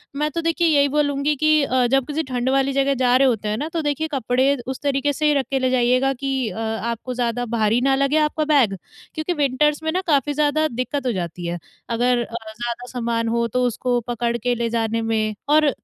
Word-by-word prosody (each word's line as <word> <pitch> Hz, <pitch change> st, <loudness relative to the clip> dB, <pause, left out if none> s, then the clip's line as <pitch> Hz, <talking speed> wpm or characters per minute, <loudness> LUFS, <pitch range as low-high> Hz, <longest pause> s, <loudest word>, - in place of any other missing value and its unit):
मैं 300 Hz, +2 st, 0 dB
तो 335 Hz, -, -2 dB
देखिए 330 Hz, +1 st, +1 dB
यही 285 Hz, -2 st, +4 dB
बोलूँगी 290 Hz, 0 st, +1 dB
कि 310 Hz, +2 st, +2 dB
अ, 255 Hz, -2 st, +1 dB
जब 270 Hz, 0 st, +2 dB
किसी 310 Hz, +2 st, -2 dB
ठंड 250 Hz, 0 st, -1 dB
वाली 270 Hz, 0 st, +2 dB
जगह 275 Hz, 0 st, +2 dB
जा 250 Hz, -1 st, +4 dB
रहे 270 Hz, -, +4 dB
होते 220 Hz, -4 st, 0 dB
हैं 215 Hz, -, -1 dB
ना, 300 Hz, -, -3 dB
तो 330 Hz, -1 st, -2 dB
देखिए 295 Hz, +2 st, -1 dB
कपड़े 260 Hz, +1 st, +1 dB
उस 265 Hz, -, -4 dB
तरीक़े 285 Hz, +1 st, +1 dB
से 305 Hz, -, -2 dB
ही 295 Hz, -, +4 dB
रख 275 Hz, -2 st, +1 dB
के 270 Hz, -, +1 dB
ले 255 Hz, 0 st, +1 dB
जाइएगा 255 Hz, +2 st, +2 dB
कि 265 Hz, -3 st, -2 dB
अ, 180 Hz, -, -8 dB
आपको 225 Hz, +2 st, -3 dB
ज़्यादा 245 Hz, 0 st, -1 dB
भारी 220 Hz, +1 st, +2 dB
ना 270 Hz, 0 st, +3 dB
लगे 275 Hz, +3 st, +1 dB
आपका 305 Hz, 0 st, +1 dB
बैग 275 Hz, -10 st, +3 dB, 0.4 s
क्योंकि 315 Hz, +3 st, -2 dB
विंटर्स 295 Hz, +1 st, +1 dB
में 315 Hz, -, 0 dB
ना, 365 Hz, +3 st, 0 dB
काफ़ी 290 Hz, -1 st, +2 dB
ज़्यादा 300 Hz, +1 st, +1 dB
दिक्कत 255 Hz, +2 st, -3 dB
हो -, -, +2 dB
जाती 175 Hz, -2 st, -5 dB
है। 175 Hz, +1 st, -3 dB, 0.3 s
अगर 240 Hz, +1 st, +1 dB
अ, 230 Hz, -, -9 dB, 0.2 s
ज़्यादा 240 Hz, +2 st, -5 dB
सामान 235 Hz, -2 st, -1 dB
हो 235 Hz, 0 st, 0 dB
तो 250 Hz, +3 st, -1 dB
उसको 245 Hz, +1 st, -1 dB
पकड़ 235 Hz, 0 st, -1 dB
के 245 Hz, +2 st, -1 dB
ले 235 Hz, 0 st, -1 dB
जाने 230 Hz, 0 st, -1 dB
में 220 Hz, -1 st, -1 dB
और 305 Hz, -1 st, +5 dB
260 Hz, 225 wpm, -21 LUFS, 235-290 Hz, 0.4 s, और